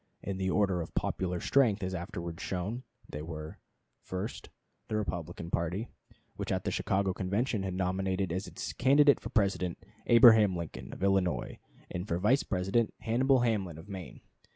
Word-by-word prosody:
In 100 -1 -3
the 95 0 -1
order 95 -2 +2
of 80 - -8
popular 90 -1 -1
strength, 110 -6 +3
as 95 0 -2
afterwards 85 -2 -5
shown, 100 +7 -3 0.3
they 75 - -6
were: 80 -1 -7 0.4
First. 95 +4 -5 0.4
The 110 - -2
Republican 85 -4 -4
party, 90 +7 -1 0.5
which - - -3
at - - 0
the - - -1
Chicago 95 -1 0
Convention 100 +5 -1
had 95 -1 -3
nominated 95 0 -1
as 95 +3 -3
its - - -5
candidate 140 +3 +5
for 110 - -7
President, 100 -6 +1 0.3
Abraham 110 -5 +7
Lincoln, 85 -2 -6
of - - -7
Illinois, 95 -9 +1 0.3
and 90 +3 -4
for 85 - 0
Vice 115 +10 +3
President, 95 +4 0
Hannibal 130 +3 +3
Hamlin, 100 -9 0
of 80 - -11
Maine. 95 -4 -8
95 Hz, 160 wpm, -31 LUFS, 90-110 Hz, 0.5 s, Abraham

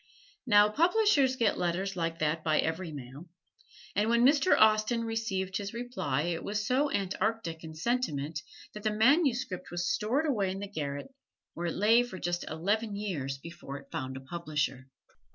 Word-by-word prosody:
Now 205 -2 +7
publishers 320 - +3
get 230 -4 +1
letters 185 +3 -1
like 165 -2 -2
that 155 +1 0
by 155 -1 +2
every 160 +1 -1
mail, 140 +4 -9 0.7
and 210 +3 +2
when 235 +1 +4
Mr. 295 +7 +4
Austen 215 +2 +4
received 195 -4 -2
his 205 +2 -5
reply 235 - -2
it 170 0 -2
was 210 0 -2
so 270 +6 +2
antarctic 190 -3 -2
in 160 -1 -8
sentiment 160 - -1 0.3
that 210 - -8
the 215 - +1
manuscript 245 - +2
was 175 0 -2
stored 250 +9 0
away 210 -10 +1
in 190 - -3
the 200 +1 -5
garret, 145 - -5 0.4
where 170 +1 -3
it 165 - -3
lay 220 +5 +5
for 245 -6 -5
just 175 0 -2
eleven 205 +7 -1
years 155 -10 -3
before 165 -2 -8
it 140 0 -15
found 130 0 -4
a - - -8
publisher. 150 -3 -3
195 Hz, 170 wpm, -30 LUFS, 160-230 Hz, 0.7 s, Now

